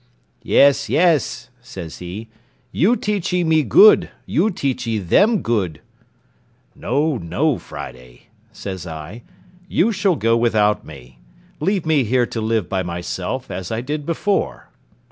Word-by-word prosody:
"Yes, 140 Hz, 0 st, +4 dB
yes," 155 Hz, -7 st, +1 dB
says 95 Hz, -10 st, -9 dB
he, 90 Hz, +6 st, -7 dB, 0.4 s
"you 210 Hz, +9 st, +3 dB
teachee 190 Hz, -5 st, -1 dB
me 160 Hz, -1 st, +3 dB
good, 200 Hz, +4 st, +6 dB, 0.2 s
you 185 Hz, +8 st, +1 dB
teachee 125 Hz, -, -2 dB
them 200 Hz, -, +2 dB
good." 95 Hz, -9 st, -1 dB, 1.0 s
"No, 145 Hz, +3 st, 0 dB
no, 120 Hz, -, 0 dB
Friday," 60 Hz, -1 st, -11 dB, 0.2 s
says 95 Hz, -3 st, -7 dB
I, 80 Hz, +8 st, -8 dB, 0.5 s
"you 215 Hz, +5 st, +2 dB
shall 195 Hz, -3 st, +1 dB
go 115 Hz, -4 st, +2 dB
without 110 Hz, -3 st, +2 dB
me; 65 Hz, -5 st, -13 dB, 0.4 s
leave 190 Hz, +2 st, 0 dB
me 155 Hz, -4 st, +3 dB
here 120 Hz, +2 st, +2 dB
to 115 Hz, -, -5 dB
live 110 Hz, -4 st, 0 dB
by 95 Hz, -1 st, -1 dB
myself, 90 Hz, +7 st, -4 dB
as 90 Hz, +1 st, -5 dB
I 110 Hz, +1 st, -2 dB
did 145 Hz, +3 st, -4 dB
before." 195 Hz, +4 st, -2 dB
120 Hz, 130 wpm, -20 LUFS, -, 1.0 s, good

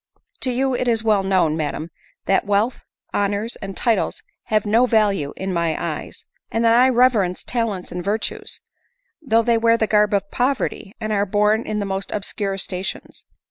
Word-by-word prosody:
" -, -, -31 dB
To 255 Hz, -, 0 dB
you 265 Hz, +2 st, 0 dB
it 250 Hz, 0 st, -1 dB
is 230 Hz, -2 st, +2 dB
well 215 Hz, -3 st, +3 dB
known, 185 Hz, -5 st, +2 dB
madam, 155 Hz, +1 st, -3 dB, 0.3 s
that 195 Hz, -, +2 dB
wealth, 205 Hz, +4 st, 0 dB, 0.3 s
hon 205 Hz, 0 st, +1 dB
ors, 220 Hz, +4 st, -3 dB
and 195 Hz, -1 st, -7 dB
titles 225 Hz, -6 st, 0 dB, 0.2 s
have 215 Hz, -1 st, +1 dB
no 230 Hz, +4 st, +4 dB
value 205 Hz, -, +2 dB
in 190 Hz, 0 st, -3 dB
my 170 Hz, -2 st, 0 dB
eyes; -, -, -5 dB, 0.2 s
and 230 Hz, +1 st, 0 dB
that 230 Hz, 0 st, +5 dB
I 255 Hz, +1 st, +6 dB
reverence 235 Hz, -8 st, +2 dB
talents 225 Hz, -7 st, -2 dB
and 180 Hz, 0 st, -4 dB
virtues, 210 Hz, +4 st, -3 dB, 0.6 s
though 230 Hz, -6 st, +2 dB
they 230 Hz, -1 st, +2 dB
wear 230 Hz, 0 st, +4 dB
the 220 Hz, -, +1 dB
garb 210 Hz, -1 st, +3 dB
of 200 Hz, 0 st, -2 dB
poverty, 250 Hz, -5 st, -1 dB
and 215 Hz, -1 st, -2 dB
are 200 Hz, 0 st, +1 dB
born 210 Hz, +3 st, +2 dB
in 215 Hz, -, -2 dB
the 205 Hz, -, -1 dB
most 195 Hz, 0 st, -4 dB
obscure 200 Hz, -1 st, -2 dB
sta 185 Hz, -1 st, -4 dB
tions. 190 Hz, -, -7 dB
210 Hz, 190 wpm, -21 LUFS, 195-230 Hz, 0.6 s, I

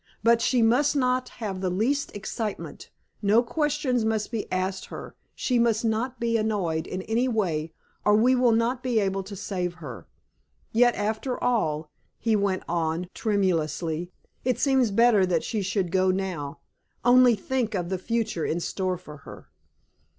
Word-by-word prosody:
But 230 Hz, +1 st, +4 dB
she 245 Hz, -1 st, +3 dB
must 265 Hz, +6 st, +3 dB
not 255 Hz, -2 st, +1 dB
have 200 Hz, -5 st, -5 dB
the 185 Hz, -, 0 dB
least 235 Hz, +11 st, 0 dB
excitement; 210 Hz, +1 st, -5 dB, 0.3 s
no 215 Hz, +3 st, +4 dB
questions 280 Hz, -2 st, 0 dB
must 220 Hz, -1 st, -1 dB
be 225 Hz, -3 st, -4 dB
asked 185 Hz, +1 st, -1 dB
her; -, -, -9 dB, 0.2 s
she 250 Hz, -2 st, +1 dB
must 230 Hz, -1 st, +2 dB
not 230 Hz, +3 st, -1 dB
be 230 Hz, -1 st, +1 dB
annoyed 195 Hz, -8 st, -1 dB
in 185 Hz, +1 st, -4 dB
any 230 Hz, +5 st, +1 dB
way, 170 Hz, -9 st, -1 dB, 0.3 s
or 210 Hz, -, +5 dB
we 240 Hz, +4 st, +4 dB
will 250 Hz, -2 st, +4 dB
not 230 Hz, +3 st, +1 dB
be 250 Hz, -3 st, +1 dB
able 195 Hz, -1 st, 0 dB
to 195 Hz, +2 st, -8 dB
save 180 Hz, -2 st, -3 dB
her. 165 Hz, -3 st, -9 dB, 0.6 s
Yet, 240 Hz, +1 st, +4 dB
after 220 Hz, +5 st, -2 dB
all," 155 Hz, -11 st, 0 dB, 0.3 s
he 225 Hz, -2 st, +1 dB
went 200 Hz, -2 st, 0 dB
on 170 Hz, +1 st, -1 dB
tremulously, 170 Hz, -4 st, -1 dB, 0.3 s
"it 255 Hz, -1 st, +1 dB
seems 265 Hz, -4 st, +3 dB
better 220 Hz, -1 st, +4 dB
that 175 Hz, -3 st, +1 dB
she 220 Hz, -3 st, -2 dB
should 190 Hz, -2 st, -1 dB
go 185 Hz, +1 st, +3 dB
now. 185 Hz, -7 st, -3 dB, 0.4 s
Only 245 Hz, -1 st, +6 dB
think 230 Hz, +1 st, -2 dB
of 175 Hz, -2 st, -2 dB
the 190 Hz, -1 st, -2 dB
future 225 Hz, -5 st, -1 dB
in 165 Hz, -, -1 dB
store 185 Hz, +1 st, -2 dB
for 155 Hz, -4 st, -11 dB
her!" 140 Hz, -, -13 dB
215 Hz, 165 wpm, -26 LUFS, 185-240 Hz, 0.6 s, Only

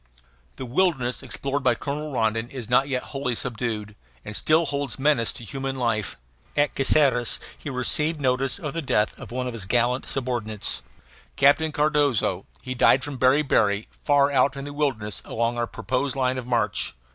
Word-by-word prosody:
The 130 Hz, -, -6 dB
wilderness 130 Hz, -3 st, +1 dB
explored 140 Hz, +1 st, -3 dB
by 125 Hz, -3 st, +3 dB
Colonel 150 Hz, +3 st, -4 dB
Rondon 115 Hz, -1 st, 0 dB
is 130 Hz, -5 st, -7 dB
not 125 Hz, +3 st, +3 dB
yet 130 Hz, -2 st, -1 dB
wholly 135 Hz, -3 st, -1 dB
subdued, 110 Hz, -3 st, -3 dB, 0.3 s
and 105 Hz, -, -6 dB
still 160 Hz, +7 st, +3 dB
holds 145 Hz, -1 st, -2 dB
menace 135 Hz, -5 st, +2 dB
to -, -, -9 dB
human 135 Hz, +4 st, -4 dB
life. 115 Hz, -5 st, -1 dB, 0.4 s
At 145 Hz, 0 st, +2 dB
Caceres 135 Hz, -3 st, +3 dB, 0.2 s
he -, -, -8 dB
received 150 Hz, +5 st, +1 dB
notice 130 Hz, 0 st, +1 dB
of 150 Hz, -7 st, -5 dB
the 165 Hz, -, -2 dB
death 110 Hz, -7 st, +1 dB
of -, -, -9 dB
one 125 Hz, +1 st, -3 dB
of 125 Hz, -, -4 dB
his 105 Hz, -5 st, -5 dB
gallant 120 Hz, +3 st, +1 dB
subordinates, 120 Hz, -5 st, -2 dB, 0.5 s
Captain 145 Hz, +3 st, +4 dB
Cardozo. 145 Hz, -, +1 dB, 0.2 s
He 130 Hz, -, -4 dB
died 130 Hz, +1 st, +4 dB
from 145 Hz, -3 st, -6 dB
beriberi, 130 Hz, -6 st, +3 dB
far 145 Hz, -1 st, +3 dB
out 135 Hz, 0 st, +2 dB
in 140 Hz, -, -5 dB
the 145 Hz, -, -7 dB
wilderness 130 Hz, -8 st, -1 dB
along 115 Hz, +1 st, -1 dB
our 120 Hz, -, 0 dB
proposed 130 Hz, +4 st, -2 dB
line 130 Hz, -1 st, 0 dB
of 125 Hz, -, -8 dB
march. 120 Hz, -, 0 dB
130 Hz, 170 wpm, -24 LUFS, 120-140 Hz, 0.5 s, Captain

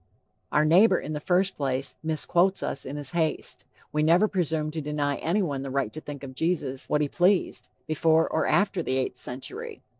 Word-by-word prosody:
Our 150 Hz, -, +3 dB
neighbor, 185 Hz, +5 st, +5 dB
in 155 Hz, -, -5 dB
the 150 Hz, -, -3 dB
first 185 Hz, +5 st, +1 dB
place, 135 Hz, -1 st, -1 dB
misquotes 170 Hz, +4 st, +1 dB
us -, -, -3 dB
in 135 Hz, -, -5 dB
his 145 Hz, -3 st, -3 dB
haste. 160 Hz, -2 st, -2 dB, 0.3 s
We 150 Hz, -, 0 dB
never 170 Hz, +7 st, +4 dB
presumed 160 Hz, -6 st, -1 dB
to 160 Hz, -, -3 dB
deny 145 Hz, -1 st, -1 dB
anyone 165 Hz, -6 st, -1 dB
the 135 Hz, -, -5 dB
right 135 Hz, -5 st, -1 dB
to 155 Hz, -, -7 dB
think 145 Hz, -2 st, -8 dB
of 130 Hz, -1 st, -7 dB
Jesus 145 Hz, -3 st, -2 dB
what 150 Hz, -, +2 dB
he 150 Hz, -, +1 dB
pleased, 180 Hz, +6 st, +1 dB, 0.2 s
before 160 Hz, +1 st, +3 dB
or 160 Hz, -, 0 dB
after 200 Hz, -3 st, +2 dB
the 130 Hz, -4 st, -1 dB
eighth 130 Hz, -1 st, -2 dB
century. 410 Hz, -, -6 dB
155 Hz, 190 wpm, -26 LUFS, 140-175 Hz, 0.3 s, neighbor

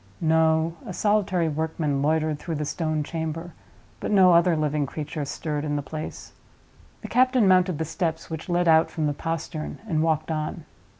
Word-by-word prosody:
No: 160 Hz, 0 st, +2 dB
a 185 Hz, -, -7 dB
solitary 195 Hz, -4 st, +1 dB
workman 155 Hz, -2 st, -1 dB
loitered 155 Hz, 0 st, +1 dB
through 165 Hz, 0 st, -4 dB
the 150 Hz, 0 st, -2 dB
stone 155 Hz, -1 st, -1 dB
chamber; 165 Hz, +2 st, -4 dB, 0.5 s
but -, -, -4 dB
no 190 Hz, -3 st, +6 dB
other 170 Hz, 0 st, +4 dB
living 150 Hz, -1 st, 0 dB
creature 150 Hz, +1 st, -5 dB
stirred 150 Hz, +1 st, -3 dB
in 145 Hz, -1 st, -1 dB
the 145 Hz, -, -2 dB
place. 155 Hz, +2 st, -7 dB, 0.7 s
The -, -, -5 dB
captain 255 Hz, -3 st, +3 dB
mounted 185 Hz, -3 st, +4 dB
the 160 Hz, -, -2 dB
steps 160 Hz, 0 st, -3 dB
which 160 Hz, +2 st, -7 dB
led 175 Hz, 0 st, +1 dB
out 160 Hz, 0 st, +5 dB
from 155 Hz, -, -2 dB
the 145 Hz, -, +1 dB
postern 165 Hz, 0 st, -4 dB
and 160 Hz, -6 st, +1 dB
walked 160 Hz, 0 st, 0 dB
on. 155 Hz, -1 st, -3 dB
160 Hz, 175 wpm, -25 LUFS, 155-170 Hz, 0.7 s, no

